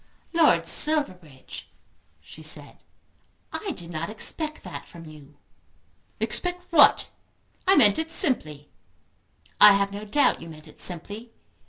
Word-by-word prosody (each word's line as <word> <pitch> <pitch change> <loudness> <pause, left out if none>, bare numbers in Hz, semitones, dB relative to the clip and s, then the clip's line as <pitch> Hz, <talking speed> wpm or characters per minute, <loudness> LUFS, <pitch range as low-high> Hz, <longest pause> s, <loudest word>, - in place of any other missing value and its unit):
"Lord 335 -1 +2
Silverbridge," 175 - +1 0.5
she 150 - -14
said, 150 -2 -6 0.7
"I 415 - -6
did 175 - -8
not 165 +2 -5
expect 305 +8 -2
that - - -9
from 170 -1 -15
you." 150 -2 -16 0.8
"Expect 360 0 -1
what? 305 -4 +4 0.6
I 385 - +5
meant 210 -5 +3
it 320 0 -4
simply." 155 - 0 0.9
"I 210 - +8
have 200 0 -1
no 205 +1 -8
doubt 280 +8 0
you 165 - -11
meant 155 0 -14
it - - -18
simply. 205 +7 -2
200 Hz, 130 wpm, -24 LUFS, -, 0.9 s, I